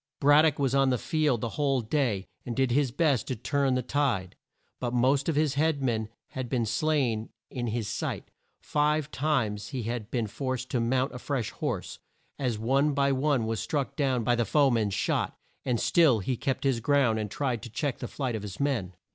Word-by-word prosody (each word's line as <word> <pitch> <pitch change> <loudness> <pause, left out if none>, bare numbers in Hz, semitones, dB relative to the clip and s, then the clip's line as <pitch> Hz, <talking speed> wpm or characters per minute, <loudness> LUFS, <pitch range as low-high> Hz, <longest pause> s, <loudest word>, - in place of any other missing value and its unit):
Brad 145 +2 +6
dock 155 -3 +2
was 135 -2 +1
on 135 -1 +4
the 125 - +2
field 150 -5 0
the 115 - -2
whole 140 -2 +2
day, 110 -5 0 0.2
and 120 - -4
did 130 -2 +1
his 140 +1 +2
best 140 -1 +1
to 130 - -2
turn 135 +3 0
the 125 - 0
tide. 120 -10 0 0.4
But 125 -1 -2
most 135 +4 +2
of 160 - 0
his 150 -2 +2
head 150 -1 +1
men 110 -4 0 0.2
had 130 -2 -5
been 120 -2 0
slain 120 -2 0 0.2
in 120 -2 -3
his 115 -1 -2
sight; - - -4 0.3
five 150 0 +1
times 125 -8 0
had 120 -3 -3
he 105 - -15
been 120 -2 -1
forced 130 +3 -4
to 125 - +1
mount 130 +4 +1
a 125 - -6
fresh 125 -6 -2
horse, - - -4 0.4
as 125 -5 0
one 135 +6 +2
by 140 0 +3
one 135 -3 +1
was 110 0 -2
struck 145 -3 -2
down 130 -5 +1
by 120 - +2
the 120 0 +2
foe 140 +4 +3
man's 110 -4 +1
shot, - - -1 0.3
and 120 -3 +1
still 160 -9 +4
he 110 +5 -1
kept 130 +2 -2
his 135 -4 +2
ground 120 -3 +2
and 105 -1 -3
tried 125 -1 -2
to 120 - -8
check 130 +4 -2
the 125 - -4
flight 130 -2 -3
of 110 - -4
his 100 -2 -7
men. 120 -11 -1
130 Hz, 210 wpm, -28 LUFS, 115-140 Hz, 0.4 s, Brad